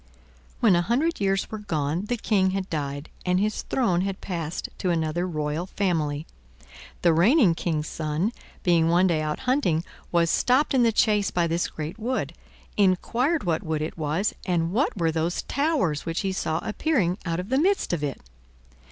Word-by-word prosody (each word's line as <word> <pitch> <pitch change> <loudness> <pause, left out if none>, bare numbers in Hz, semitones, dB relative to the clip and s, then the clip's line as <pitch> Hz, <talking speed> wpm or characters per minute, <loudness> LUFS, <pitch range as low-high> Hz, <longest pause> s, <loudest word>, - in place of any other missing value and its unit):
When 220 -7 +5
a 175 - +3
hundred 265 - 0
years 195 -1 0
were 215 - -4
gone 160 -2 -2
the 245 +3 -1
King 200 -4 +2
had 190 -1 -3
died, 145 -1 -3
and 180 0 +2
his 215 +1 0
throne 185 -9 +1
had 195 0 -3
passed 170 -4 -4
to 185 - 0
another 170 +1 0
royal 155 +1 -2
family. 160 -7 -1 0.8
The 170 -2 +5
reigning 200 - +5
King's 155 -2 -2
son, 155 +6 -1 0.3
being 170 -2 +3
one 175 +2 +4
day 165 -4 +2
out 150 0 -3
hunting, 250 - +1 0.3
was 170 -1 +3
stopped 260 +4 +2
in 260 - +4
the 230 -1 +4
chase 210 -2 +2
by 175 -1 +1
this 170 +1 0
great 155 +7 -6
wood, 250 +4 -2 0.4
inquired 235 - +2
what 165 -3 0
wood 155 -2 -2
it 155 - -4
was 160 +6 -1
and 170 -2 0
what 235 +2 0
were 165 -2 +1
those 165 +2 -1
towers 280 - 0
which 165 0 -2
he 195 -2 -1
saw 160 -4 -1
appearing 215 - 0
out 170 -1 -2
of 180 +3 -5
the 265 +1 +2
midst 390 - +1
of 160 -4 -1
it. 140 -3 -3
180 Hz, 180 wpm, -25 LUFS, 160-215 Hz, 0.8 s, When